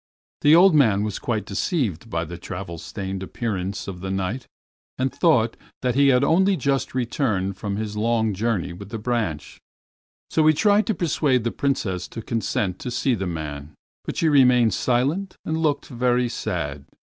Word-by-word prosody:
The 150 +2 +6
old 185 +1 +7
man 110 -9 +4
was 105 -2 -3
quite 110 -3 -2
deceived 110 - -2
by 85 -4 -2
the 85 +1 -8
travel 90 -1 -6
stained 95 +2 -5
appearance 100 -1 -3
of 95 -2 -6
the 95 +1 -5
Knight, 95 +6 -3 0.5
and 130 +1 -1
thought 120 -10 +3 0.3
that 125 -1 +1
he 140 +2 +4
had 130 -1 +4
only 190 +6 +3
just 135 -3 -1
returned 110 -6 -1
from 100 0 -4
his 105 0 -4
long 110 0 +1
journey 100 -4 -1
with 100 +3 -10
the 115 - -4
branch. 105 - -3 0.7
So 155 -1 +3
he 155 - +5
tried 210 +5 +3
to 220 - +1
persuade 145 -7 +1
the 120 - -1
Princess 100 -10 -1
to 115 - -8
consent 105 -5 -2
to - - -5
see 125 +2 0
the 95 -4 -2
man. 75 -3 -6 0.3
But - - -5
she 165 - +2
remained 125 - +5
silent 140 - 0
and 160 - -1
looked 150 -3 0
very 125 -1 +1
sad. 70 -9 -4
115 Hz, 175 wpm, -23 LUFS, 95-135 Hz, 0.7 s, old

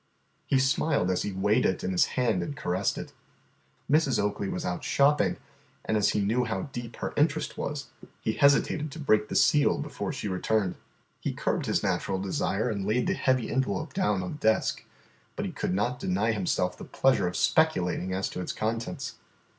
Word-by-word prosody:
He 135 - +3
smiled 135 - +2
as 90 - 0
he 105 - -2
weighed 100 +3 +2
it 95 - 0
in 90 - -1
his 90 - +4
hand 115 -7 +2
and 140 +12 -5
caressed 90 -2 -1
it. - - -7 0.7
Mrs. 145 -5 +3
Oakley 100 -1 -1
was - - -3
out 90 - -3
shopping, 145 +2 +3 0.5
and 110 - 0
as 105 -1 +3
he 105 - +1
knew 115 +5 +1
how 110 +2 -3
deep 120 -1 -6
her - - -4
interest 150 +1 +1
was, 140 -1 -4 0.3
he 110 - -1
hesitated 145 +3 +3
to - - -8
break 110 -7 +2
the - - -5
seal 145 -1 +4
before 150 0 -4
she 125 -6 -4
returned. 95 0 0 0.5
He - - -2
curbed - - -1
his - - +1
natural 95 - 0
desire 100 +3 -1
and 100 -4 -2
laid 120 +4 +1
the - - +1
heavy 130 -3 +1
envelope 135 +5 -1
down 105 - +1
on 90 - -4
the - - -6
desk. 110 -4 +1 0.5
But - - -3
he - - -3
could 90 - -2
not 120 +5 0
deny 100 +2 +1
himself 90 -3 0
the - - -7
pleasure 135 -8 +2
of 90 - -3
speculating 95 - +2
as 95 +1 -1
to 90 - -5
its - - -4
contents. 115 +1 -3
110 Hz, 195 wpm, -28 LUFS, 95-135 Hz, 0.7 s, his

